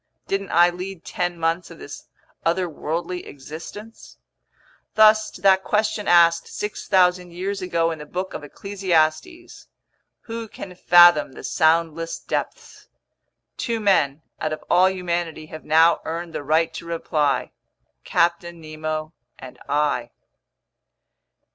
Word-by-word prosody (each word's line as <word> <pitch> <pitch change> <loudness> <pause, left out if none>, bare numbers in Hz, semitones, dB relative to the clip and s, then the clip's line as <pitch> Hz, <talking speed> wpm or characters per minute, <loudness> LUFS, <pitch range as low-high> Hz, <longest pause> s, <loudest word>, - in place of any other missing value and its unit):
Didn't 195 0 -2
I 175 +1 +5
lead 185 0 -8
ten 175 -1 -3
months 165 +2 -1
of 165 - -12
this 145 - -10 0.4
otherworldly 170 0 -2
existence? 165 +10 -11 0.8
Thus 215 0 +5
to - - -13
that 190 0 +4
question 210 0 0
asked 170 -1 +5
6,000 180 -3 0
years 190 +3 -4
ago 170 -2 0
in 160 - -6
the 150 - -9
Book 185 +4 -4
of - - -6
Ecclesiastes—"Who 200 - -4
can 190 -3 -9
fathom 175 -5 +6
the - - -11
soundless 165 0 +1
depths?"—two 230 -3 -7
men 160 -8 +2 0.2
out 155 - -2
of 155 - -7
all 185 +1 +5
humanity 175 -4 -3
have 155 - -9
now 160 +2 +4
earned 165 +1 -5
the - - -4
right 155 +3 +1
to - - -8
reply. 150 -5 -1 0.5
Captain 170 0 0
Nemo 155 0 -5 0.2
and 130 -1 -12
I. 145 -5 0
170 Hz, 120 wpm, -22 LUFS, 155-190 Hz, 0.8 s, fathom